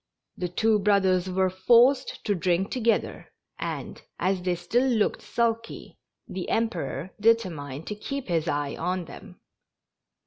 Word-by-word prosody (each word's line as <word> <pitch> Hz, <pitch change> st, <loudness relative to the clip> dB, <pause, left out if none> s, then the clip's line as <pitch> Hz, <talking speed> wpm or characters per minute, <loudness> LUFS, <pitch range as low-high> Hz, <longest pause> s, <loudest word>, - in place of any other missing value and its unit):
The 180 Hz, -, -3 dB
two 215 Hz, +4 st, +2 dB
brothers 190 Hz, -2 st, +2 dB
were 185 Hz, 0 st, +1 dB
forced 240 Hz, +8 st, +3 dB
to 205 Hz, -, +2 dB
drink 180 Hz, +1 st, 0 dB
together, 235 Hz, -3 st, -1 dB, 0.3 s
and, -, -, -5 dB, 0.2 s
as 185 Hz, 0 st, 0 dB
they 180 Hz, 0 st, 0 dB
still 240 Hz, +9 st, +1 dB
looked 220 Hz, -4 st, +1 dB
sulky, 230 Hz, -1 st, -2 dB, 0.3 s
the 185 Hz, -1 st, -5 dB
Emperor 190 Hz, -7 st, -2 dB
determined 165 Hz, -11 st, +1 dB
to -, -, -4 dB
keep 275 Hz, +6 st, -5 dB
his 165 Hz, -2 st, 0 dB
eye 145 Hz, -2 st, -1 dB
on 180 Hz, +1 st, -2 dB
them. -, -, -12 dB
190 Hz, 135 wpm, -26 LUFS, 175-230 Hz, 0.3 s, forced